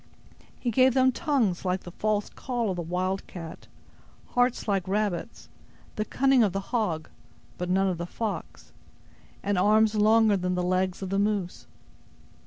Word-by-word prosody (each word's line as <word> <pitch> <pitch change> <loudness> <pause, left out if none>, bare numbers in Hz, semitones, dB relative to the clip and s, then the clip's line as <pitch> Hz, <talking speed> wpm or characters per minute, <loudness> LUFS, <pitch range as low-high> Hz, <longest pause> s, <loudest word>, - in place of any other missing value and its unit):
He 240 - -1
gave 255 +2 +4
them 260 0 +5
tongues 250 - 0
like 185 0 -1
the 175 - -10
false 210 +2 -1
call 240 -5 -2
of - - -3
the 175 - -3
wildcat; 180 -1 -4 0.6
hearts 245 -1 +1
like 195 -3 0
rabbits; 200 -3 -2 0.5
the 215 - -1
cunning 270 0 +3
of 205 -5 +2
the 195 - -1
hog 175 -10 0 0.5
(but 180 0 -3
none 190 +1 +3
of 180 -3 -2
the 170 - -4
fox), 215 +2 -5 0.7
and 200 -2 +1
arms 215 +3 +4
longer 215 0 +4
than 180 0 -1
the 180 - -1
legs 185 +1 0
of 190 - -5
the 195 - +1
moose. 200 -3 -1
200 Hz, 160 wpm, -27 LUFS, 180-220 Hz, 0.7 s, them